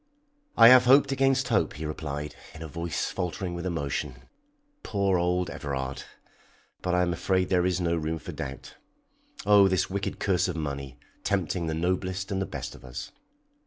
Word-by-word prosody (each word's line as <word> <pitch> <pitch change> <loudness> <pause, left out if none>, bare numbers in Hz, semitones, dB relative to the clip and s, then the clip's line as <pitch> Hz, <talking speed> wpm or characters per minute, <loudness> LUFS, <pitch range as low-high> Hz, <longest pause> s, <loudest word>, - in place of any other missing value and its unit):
"I 115 - +10
have 125 0 +8
hoped 140 +2 +6
against 135 -1 +2
hope," 100 -9 +2
he 80 +1 -6
replied, 75 -1 -4 0.2
in 80 - -8
a - - -6
voice 85 +2 -3
faltering 90 +1 -3
with 85 +1 -4
emotion. 70 -6 -3 0.6
"Poor 100 -3 +1
old 90 0 0
Everard! 65 -1 -4 0.8
But 90 -1 0
I 90 - +3
am 90 -1 0
afraid 95 +2 0
there 90 -1 +3
is 90 -1 0
no 85 -1 +1
room 80 0 -2
for - - -8
doubt. 70 0 -7 0.7
Oh, 100 -1 +7
this 95 0 0
wicked 100 +1 -3
curse 95 -3 +1
of 90 - -3
money 70 -4 -5 0.3
tempting 90 -3 -1
the 80 - -1
noblest 95 +3 -2
and 95 0 -1
the 95 - -2
best - - -6
of - - -14
us." - - -7
90 Hz, 175 wpm, -27 LUFS, 80-95 Hz, 0.8 s, I